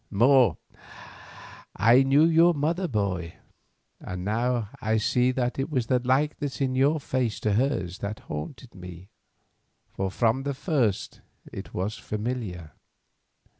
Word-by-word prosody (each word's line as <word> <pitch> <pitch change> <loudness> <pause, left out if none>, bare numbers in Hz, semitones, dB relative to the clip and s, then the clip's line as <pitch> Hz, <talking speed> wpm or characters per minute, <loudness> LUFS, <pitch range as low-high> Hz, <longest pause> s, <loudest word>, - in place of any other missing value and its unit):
More, 120 - +4 1.2
I 115 +5 +5
knew 135 +3 +4
your 165 +1 +5
mother, 165 +6 0
boy, 100 - -2 0.6
and 90 0 -6
now 115 +1 0
I 110 +1 +1
see 125 +4 +2
that 125 0 -2
it 135 - -1
was 130 -6 0
the 125 +1 +2
likeness 135 +2 -1
in 135 -2 0
your 140 +4 +2
face 130 -5 -2
to 105 - +1
hers 110 -7 -1
that 105 +2 -5
haunted 115 - -7
me, 90 0 -11 0.8
for 95 0 -2
from 115 +6 +1
the 140 0 -3
first 130 - -1 0.3
it - - -8
was 100 +4 -3
familiar. 105 -7 -4
120 Hz, 130 wpm, -26 LUFS, 100-135 Hz, 1.2 s, I